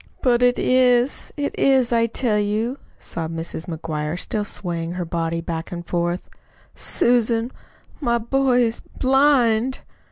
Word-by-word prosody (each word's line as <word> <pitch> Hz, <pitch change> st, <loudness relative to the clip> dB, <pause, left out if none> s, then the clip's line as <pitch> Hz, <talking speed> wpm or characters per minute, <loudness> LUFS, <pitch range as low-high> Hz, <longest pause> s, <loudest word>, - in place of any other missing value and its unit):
"But 245 Hz, -2 st, +3 dB
it 245 Hz, 0 st, +4 dB
is, 255 Hz, 0 st, +2 dB
it 285 Hz, -1 st, -2 dB
is, 260 Hz, -3 st, +3 dB
I 230 Hz, -1 st, +3 dB
tell 225 Hz, -2 st, 0 dB
you," 215 Hz, +6 st, -1 dB, 0.2 s
sobbed 165 Hz, -1 st, -5 dB
Mrs. 165 Hz, 0 st, -5 dB
McGuire 160 Hz, -1 st, -3 dB
still 210 Hz, +2 st, -1 dB
swaying 170 Hz, -4 st, -3 dB
her 180 Hz, -1 st, -3 dB
body 165 Hz, 0 st, -2 dB
back 165 Hz, 0 st, -5 dB
and 175 Hz, -1 st, -6 dB
forth. 175 Hz, +1 st, -2 dB, 0.5 s
"Susan, 235 Hz, 0 st, +1 dB, 0.5 s
my 235 Hz, -5 st, +1 dB
boy 250 Hz, +1 st, +2 dB
is 230 Hz, 0 st, -1 dB, 0.2 s
BLIND." 260 Hz, -3 st, +3 dB
225 Hz, 135 wpm, -22 LUFS, 170-250 Hz, 0.5 s, it